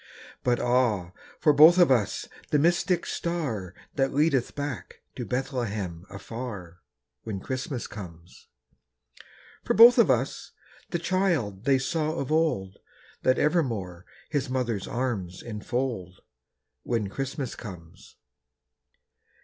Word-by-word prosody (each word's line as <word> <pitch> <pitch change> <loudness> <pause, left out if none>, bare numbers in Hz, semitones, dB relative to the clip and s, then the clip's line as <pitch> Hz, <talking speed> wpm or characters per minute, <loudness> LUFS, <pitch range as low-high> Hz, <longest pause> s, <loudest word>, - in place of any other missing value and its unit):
But 120 -1 +2
ah, 120 -8 +1 0.3
for 150 - +4
both 155 +5 +8
of 175 -6 +6
us 110 -5 +1 0.2
the 150 - +3
mystic 175 +3 +2
star 125 - -3 0.2
That 135 -1 +1
leadeth 140 -4 +2
back 145 -4 -5
to - - -4
Bethlehem 105 - -3
afar, 100 -4 -7 0.4
When 100 -3 -5
Christmas 130 +3 -4
comes. 90 -4 -11 1.2
For - - 0
both 235 +2 +9
of - - +5
us - - 0 0.4
the 170 - -1
child 170 - 0
they 135 -1 +4
saw 155 +3 -1
of 140 -3 -3
old, 150 -13 0 0.4
That 130 0 +3
evermore 115 - 0 0.2
his 145 -3 -1
mother's 120 -6 -1
arms 110 -8 -3
enfold, 110 -4 -4 0.6
When 115 - -1
Christmas 135 +4 -4
comes. 90 -7 -11
125 Hz, 115 wpm, -27 LUFS, 100-145 Hz, 1.2 s, both